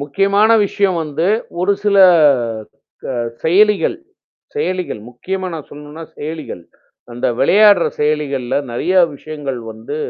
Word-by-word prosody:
முக்கியமான 200 Hz, +9 st, +1 dB, 0.2 s
விஷயம் 195 Hz, -3 st, 0 dB
வந்து, 155 Hz, +2 st, -2 dB, 0.3 s
ஒரு 190 Hz, +3 st, +2 dB
சில 205 Hz, -1 st, +2 dB, 1.1 s
க -, -, -4 dB, 0.3 s
செயலிகள் 205 Hz, -, +3 dB, 0.6 s
செயலிகள் 185 Hz, -, -3 dB
முக்கியமா 185 Hz, +10 st, -5 dB
நான் 155 Hz, -3 st, -8 dB
சொல்லணும்ன்னா, 150 Hz, +2 st, -10 dB
செயலிகள். 155 Hz, -, -7 dB, 0.5 s
அந்த 120 Hz, -, -2 dB
விளையாடுற 200 Hz, +3 st, +5 dB
செயலிகள்ல 140 Hz, -4 st, -1 dB
நெறையா 180 Hz, +10 st, +1 dB, 0.2 s
விஷயங்கள் 145 Hz, -3 st, -6 dB
வந்து 110 Hz, +6 st, -8 dB
160 Hz, 105 wpm, -17 LUFS, 145-195 Hz, 1.1 s, விளையாடுற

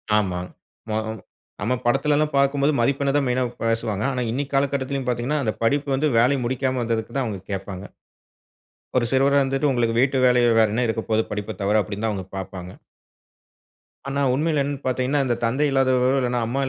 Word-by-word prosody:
ஆமா. 95 Hz, -4 st, +1 dB, 0.5 s
மொ 110 Hz, -, -1 dB
அ -, -, -2 dB, 0.5 s
நம்ம 120 Hz, +5 st, +1 dB
படத்தில 135 Hz, +4 st, +2 dB
எல்லாம் 150 Hz, 0 st, 0 dB
பார்க்கும்போது 140 Hz, +2 st, +2 dB
மதிப்பெண்ண 140 Hz, +3 st, +1 dB
தான் 145 Hz, -, +2 dB
மெயினா 125 Hz, +1 st, +1 dB, 0.2 s
பேசுவாங்க, 115 Hz, -2 st, -1 dB
ஆனா 125 Hz, -1 st, -2 dB
இன்னக்கி 140 Hz, +3 st, -3 dB
காலகட்டத்திலும் 135 Hz, -1 st, -1 dB
பார்த்தீங்கன்னா, 125 Hz, +5 st, 0 dB
அந்த 110 Hz, -, 0 dB
படிப்பு 140 Hz, +5 st, +1 dB
வந்து 145 Hz, +3 st, +1 dB
வேலை 125 Hz, +5 st, +4 dB
முடிக்காம 130 Hz, +1 st, -1 dB
வந்ததுக்கு 115 Hz, -1 st, -2 dB
தான் 135 Hz, -, +1 dB
அவுங்க 105 Hz, -4 st, -4 dB
கேப்பாங்க. 95 Hz, 0 st, -5 dB, 1.1 s
ஒரு 120 Hz, -, +2 dB
சிறுவரா 140 Hz, +1 st, +4 dB
இருந்துட்டு, 135 Hz, +2 st, +1 dB
உங்களுக்கு 115 Hz, -2 st, 0 dB
வீட்டு 135 Hz, +1 st, +2 dB
வேலை 125 Hz, -1 st, +4 dB, 0.2 s
வேற 110 Hz, -, +5 dB
என்ன 120 Hz, +2 st, +1 dB
இருக்கபோது, 110 Hz, 0 st, 0 dB
படிப்ப 105 Hz, +1 st, -4 dB
தவிர 105 Hz, +2 st, +3 dB
அப்பிடின்னு 100 Hz, +3 st, -4 dB
தான் 110 Hz, -, +1 dB
அவுங்க 95 Hz, -2 st, -5 dB
பார்ப்பாங்க. 90 Hz, -1 st, -7 dB, 1.4 s
ஆனா, 140 Hz, +1 st, -1 dB
உண்மையில 150 Hz, +2 st, +1 dB
என்னனு 140 Hz, 0 st, -4 dB
பார்த்தீங்கன்னா, 130 Hz, +2 st, +1 dB
இந்த 120 Hz, -2 st, +1 dB
தந்தை 130 Hz, +6 st, +1 dB
இல்லாதவர்கள், 130 Hz, 0 st, +2 dB
இல்லனா 125 Hz, 0 st, 0 dB
அம்மா 135 Hz, +4 st, -1 dB
125 Hz, 175 wpm, -23 LUFS, 110-140 Hz, 1.4 s, வேற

